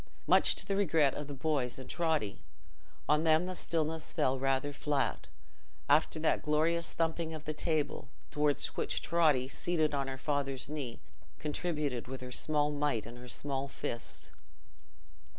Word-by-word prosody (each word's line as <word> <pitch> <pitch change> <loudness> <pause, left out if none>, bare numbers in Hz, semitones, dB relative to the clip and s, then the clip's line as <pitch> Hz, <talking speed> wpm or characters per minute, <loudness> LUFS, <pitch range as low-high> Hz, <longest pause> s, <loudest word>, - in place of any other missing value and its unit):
Much - - +5
to - - -3
the 195 - 0
regret 160 -8 +3
of 145 - -5
the 145 - -6
boys 135 -4 0
and 130 - -8
Totty: 160 - 0 0.7
on 150 +1 +3
them 160 +1 +4
the 185 - -3
stillness 160 -2 -1
fell 135 -5 +1
rather 135 +2 +1
flat, 140 -1 -1 0.6
after 155 +2 +4
that 160 - +2
glorious 160 +3 +1
thumping 165 0 -1
of 155 - -9
the 155 - -2
table, 150 -3 -1 0.2
towards 150 -1 +2
which - - -1
Totty, 155 -7 +3
seated 155 +1 0
on 140 -1 0
her 135 0 -4
father's 135 -2 -1
knee, 140 -6 -5 0.4
contributed 150 -5 -2
with 130 0 -6
her 125 0 -7
small 150 +2 +2
might 145 -7 0
and 120 +2 -9
small 140 +1 -2
fist. 120 -3 -5
150 Hz, 150 wpm, -33 LUFS, 135-160 Hz, 0.7 s, Much